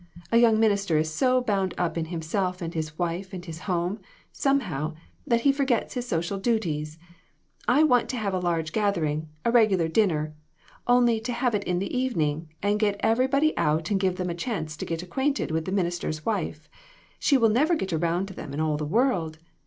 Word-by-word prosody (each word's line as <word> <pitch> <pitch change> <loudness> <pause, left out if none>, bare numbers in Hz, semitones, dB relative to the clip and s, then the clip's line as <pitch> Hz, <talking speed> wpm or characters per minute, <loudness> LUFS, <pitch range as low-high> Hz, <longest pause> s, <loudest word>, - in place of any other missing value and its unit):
A 230 - +5
young 230 -2 +5
minister 200 -6 +2
is 155 0 0
so 255 - +3
bound 195 -5 0
up 170 -2 -1
in 165 -1 -1
himself 180 +3 -2
and 170 -2 -5
his 155 -2 -4
wife 180 +2 -3
and 180 -1 -6
his 165 -2 -7
home, 180 +3 0 0.3
somehow, 180 - 0 0.3
that 235 -1 +2
he 280 - +5
forgets 270 -4 0
his 245 -1 -4
social 175 +1 -1
duties. 165 -9 -1 0.7
I 270 +6 +5
want 250 -6 +3
to 255 - -2
have 205 -4 -2
a 185 - 0
large 165 -3 -1
gathering 160 -8 0 0.2
a 235 - +3
regular 210 -8 +4
din 210 +6 +3
ner 155 -1 -2 0.5
only 240 -2 +4
have 245 0 0
it 205 -1 0
in 180 - 0
the 195 +7 -3
evening, 165 - -1
and 205 +1 +2
get 205 -2 +1
every 250 +4 +3
body 285 +3 +2
out 155 +4 +1
and 195 - +2
give 190 -2 +1
them 180 -1 -2
a - - -2
chance 170 -5 -4
to - - -4
get 165 +1 -3
acquaint 265 +11 -1
ed - - -2
with 160 0 -1
the 185 - -3
minister's 175 -5 -2
wife; 165 -7 -2 0.5
she 280 - +4
will 230 -3 +4
never 300 +10 +3
get 190 - -3
around 170 +3 0
to - - -8
them 140 -5 -7
in - - -3
all 155 -1 +1
the 150 0 -3
world. 180 - +1
190 Hz, 210 wpm, -26 LUFS, 160-235 Hz, 0.7 s, A